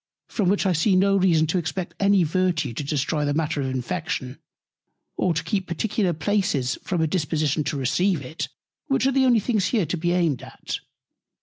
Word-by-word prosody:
from 200 -6 0
which 200 +1 +1
I 190 - +3
see 185 +4 +2
no 195 +1 +4
reason 175 -5 +4
to 160 +4 0
expect 170 +2 -4
any 200 -2 +4
Virtue 165 -5 0
to 145 - -4
destroy 150 +1 -1
the 145 0 0
Matter 155 -2 0
of 135 - -1
Infection, 130 0 -3 0.8
or 185 - +1
to 165 - -1
keep 195 -4 -2
particular 190 +2 0
Places 160 - 0
from 175 -3 -1
a - - +3
Disposition 155 -2 0
to 145 - -2
receive 150 +6 +1
it; 145 +6 -5 0.4
which 270 -3 +1
are 270 - +3
the 265 0 +3
only 240 -3 +5
things 210 -3 0
here 215 -8 +1
to 165 +3 -2
be 175 +2 0
aimed 165 -8 +1
at. - - -6
170 Hz, 195 wpm, -24 LUFS, 150-195 Hz, 0.8 s, only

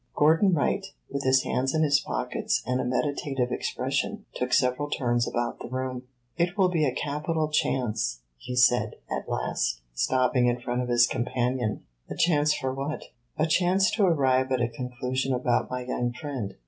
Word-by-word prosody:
Gordon 165 +5 +4
Wright, 180 +6 +1 0.3
with 140 0 -2
his 130 0 +4
hands 135 +3 0
in 160 - +3
his 145 -1 +4
pockets - - -2
and 125 0 0
a - - -2
meditative 130 0 -1
expression, - - -2
took 125 0 -3
several 125 +3 +2
turns 120 -4 0
about 120 0 -2
the - - -7
room. 130 0 -4 0.3
"It 175 +3 0
will 190 -2 +4
be 165 -4 +1
a 135 - +1
capital 150 +3 -2
chance," 110 - 0 0.2
he 125 - -6
said, 125 -3 +3 0.2
at - - -3
last, - - -1
stopping 125 - +2
in 120 0 +1
front 120 +1 -2
of 125 - -4
his 120 0 +5
companion. 125 -2 -1 0.3
"A - - -5
chance 150 -3 +3
for 130 -3 -1
what?" 140 +3 -5 0.3
"A 155 - +2
chance 185 +4 +3
to 215 - +1
arrive 130 -5 +2
at 130 - +2
a 120 - +2
conclusion 125 +2 -2
about 125 -1 0
my 125 -1 -4
young 125 -1 -1
friend." 125 -8 -5
130 Hz, 175 wpm, -27 LUFS, 125-150 Hz, 0.3 s, his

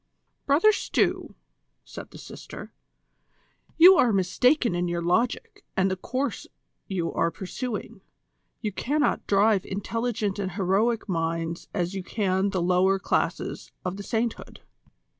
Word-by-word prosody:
"Brother 310 +10 +5
Stew," - - -1 0.5
said - - -9
the - - -12
sister, - - -10 1.0
"you 365 +3 +9
are 240 - +4
mistaken 235 - +2
in 175 0 -1
your 170 0 -2
logic 225 +8 0
and 190 0 +2
the - - 0
course 255 +6 -3 0.4
you 175 -4 -2
are 165 - +1
pursuing. 205 +7 -6 0.6
You 215 -3 -2
cannot 290 +9 0
drive 200 -1 +3
intelligent 215 +1 -2
and 190 -2 -3
heroic 205 +5 +1
minds 165 -2 -2
as 180 -2 -2
you 195 - -3
can 190 0 0
the 185 -3 -1
lower 185 +2 +3
classes - - -2
of 180 +1 -3
the - - -6
sainthood. 225 +2 -3
195 Hz, 130 wpm, -26 LUFS, 180-235 Hz, 1.0 s, you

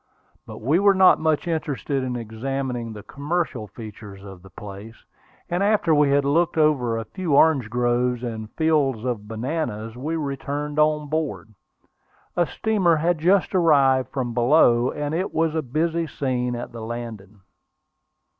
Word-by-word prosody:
But - - -9
we 145 +10 +2
were 200 0 +4
not 190 -1 +6
much 160 +1 0
interested 145 -5 -2
in 125 -1 -3
examining 120 +1 -4
the 105 -2 -9
commercial 145 - -3
features 105 -2 -11
of 95 -3 -11
the 95 - -15
place, 100 +3 -10 0.5
and 175 +2 -1
after 200 -5 +2
we 145 -1 +4
had 140 0 +2
looked 165 +4 +1
over 135 -7 +2
a 115 - -4
few 180 -7 -2
orange 140 -7 +4
groves 125 +1 0
and 110 -3 -5
fields 145 -8 +1
of 115 -5 -3
bananas, 115 -2 -4
we 150 +6 -3
returned 145 0 -3
on 150 -1 +2
board. 135 - -3 0.8
A 175 -2 +2
steamer 200 -7 +1
had 165 +1 0
just 185 +4 +2
arrived 135 -7 +3
from 130 -3 -3
below, 120 -1 +4
and 150 0 -4
it 180 +4 -2
was 160 -1 +1
a 160 - 0
busy 165 +5 -1
scene 125 -4 -2
at 120 - -6
the 115 -1 -8
landing. 110 -3 -7
135 Hz, 155 wpm, -23 LUFS, 115-160 Hz, 0.8 s, not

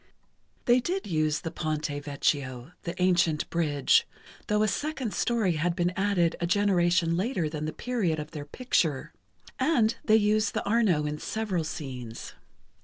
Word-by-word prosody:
They 245 +1 +5
did 365 +9 -2
use 155 -3 0
the 165 - -4
Ponte 155 -2 -2 0.2
Vecchio, 135 -2 -1
the 170 +1 -5
ancient 175 -4 +2
bridge, 150 -5 +2 0.4
though 210 0 +2
a - - +3
second 270 0 -2
story 220 -9 +1
had 170 +2 0
been 175 -1 +1
added 190 -4 +1
a 170 - +1
generation 175 -3 +2
later 185 -3 0
than 150 0 -4
the 155 - -2
period 215 -10 -1
of 150 0 -6
their 150 -3 -6
picture. 160 - -1 0.5
And 255 -6 +3
they 215 - +4
used 210 -1 +2
the - - -1
Arno 200 -8 +2
in 150 0 -3
several 205 -5 -2
scenes. 130 -7 -7
175 Hz, 155 wpm, -28 LUFS, 155-215 Hz, 0.5 s, They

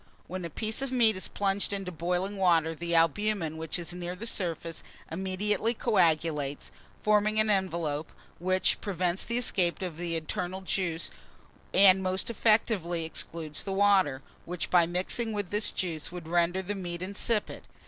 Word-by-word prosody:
When 185 +1 -6
a - - -4
piece 220 - -2
of 275 -1 -2
meat 235 -4 +4
is 185 - -1
plunged 200 0 0
into 195 -2 -3
boiling 180 +4 -2
water, 170 -4 +3
the 170 +1 -2
albumen 165 0 +2
which 160 +2 -2
is 175 0 -5
near 175 0 -5
the 215 - -7
surface 170 -6 -1 0.3
immediately 195 +6 0
coagulates, 160 - +1 0.3
forming 210 0 +3
an 215 0 +3
envelope, 170 -6 -1 0.3
which 185 +2 +1
prevents 185 -2 -1
the 235 +1 -2
escape 185 -8 +2
of 175 -4 -5
the 170 -1 -2
internal 180 +3 -3
juice, 180 -3 -1 0.6
and 190 -1 +6
most 185 +4 -1
effectually 205 -7 +1
excludes 160 -1 -3
the 195 - -4
water, 190 -9 +3 0.2
which, 175 0 -4
by 175 -2 +5
mixing 190 +6 -1
with 205 -3 -3
this 210 +1 +3
juice, 165 -5 -3
would 175 -2 -8
render 175 +2 +1
the 200 +3 -3
meat 175 -3 -5
insipid. 205 +3 -1
185 Hz, 160 wpm, -29 LUFS, 170-205 Hz, 0.6 s, and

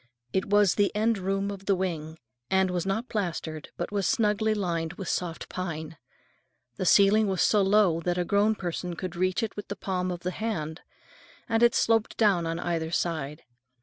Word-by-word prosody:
It 190 - +1
was 205 -2 +4
the 205 -1 +2
end 220 0 +2
room 195 +1 -1
of 195 -1 -9
the 200 - +4
wing, 165 -4 -3 0.3
and 190 -1 +2
was 180 +1 -2
not 220 +6 -1
plastered, 165 -7 -3
but - - -4
was 200 -2 0
snugly 215 0 +2
lined 170 -5 -2
with 190 +1 -7
soft 170 -2 -3
pine. 165 -3 -5 0.8
The 185 - -1
ceiling 205 +3 +5
was 190 -3 +1
so 210 - +4
low 195 -4 +4
that 175 +1 -1
a 180 - 0
grown 205 +4 +2
person 175 -2 -4
could 185 +1 -5
reach 185 +5 0
it 220 - -3
with 205 - -7
the 200 - -4
palm 185 -1 -2
of 175 -1 -4
the 180 - -2
hand, 170 -7 -4 0.7
and 225 -2 +1
it 235 -1 +5
sloped 225 -1 +2
down 195 -7 +3
on 165 0 -2
either 170 -2 -2
side. 160 -3 -2
190 Hz, 190 wpm, -27 LUFS, 170-205 Hz, 0.8 s, ceiling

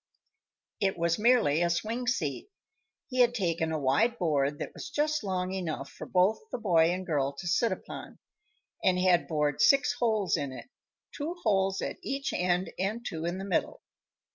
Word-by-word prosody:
It 195 -2 0
was 170 +1 +1
merely 215 - +4
a 175 - +2
swing 225 +8 -2
seat. 165 - -1 0.6
He 255 -1 -4
had 240 -1 +5
taken 170 -6 0
a 160 - 0
wide 150 - +2
board 145 -5 +1
that - - -6
was - - -8
just 300 -2 0
long 185 -2 -2
enough 165 -7 -4
for - - -9
both 185 +4 +3
the - - -2
boy 170 -7 +3
and 185 +1 -3
girl 140 -5 0
to 175 +6 -7
sit 180 +7 +2
upon, - - -7 0.7
and 185 -1 +3
had 180 -1 +3
bored 150 -2 0
six 275 - +5
holes 215 -7 +1
in 140 -2 -3
it 190 - -10 0.4
two 320 +4 -4
holes 195 -3 +1
at - - -4
each 275 0 -3
end 180 +1 0
and 215 +5 -2
two 160 0 -4
in 175 +2 -2
the 190 - -5
middle. 190 -4 -1
185 Hz, 180 wpm, -29 LUFS, 160-230 Hz, 0.7 s, had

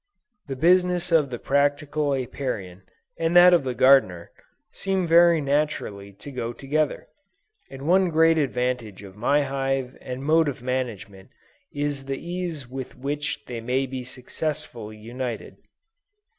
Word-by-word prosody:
The 135 - -4
business 180 +4 +3
of 155 -4 +4
the 120 - -4
practical 145 +2 +1
Apiarian, 120 -8 -4 0.4
and 165 +1 0
that 180 0 +9
of 170 - +4
the 130 -2 -3
Gardener, 125 -10 +4 0.4
seem 190 -2 -1
very 170 0 +6
naturally 140 -9 -1
to 105 +9 -11
go 120 -2 -4
together, 145 +3 -1 0.6
and 135 0 -9
one 185 +4 +3
great 165 0 +4
advantage 125 -7 -2
of 95 -1 -12
my 140 +7 +2
hive 135 -1 -2
and 130 +1 -6
mode 160 +2 +3
of 130 -4 -4
management 115 -6 -4 0.4
is 145 -1 -3
the 135 0 -3
ease 170 -5 -5
with 130 0 -7
which 145 +4 -4
they 120 -2 -6
may 125 +3 0
be 130 -1 -6
successfully 125 -3 -5
united. 120 +2 -6
135 Hz, 140 wpm, -24 LUFS, 125-155 Hz, 0.6 s, that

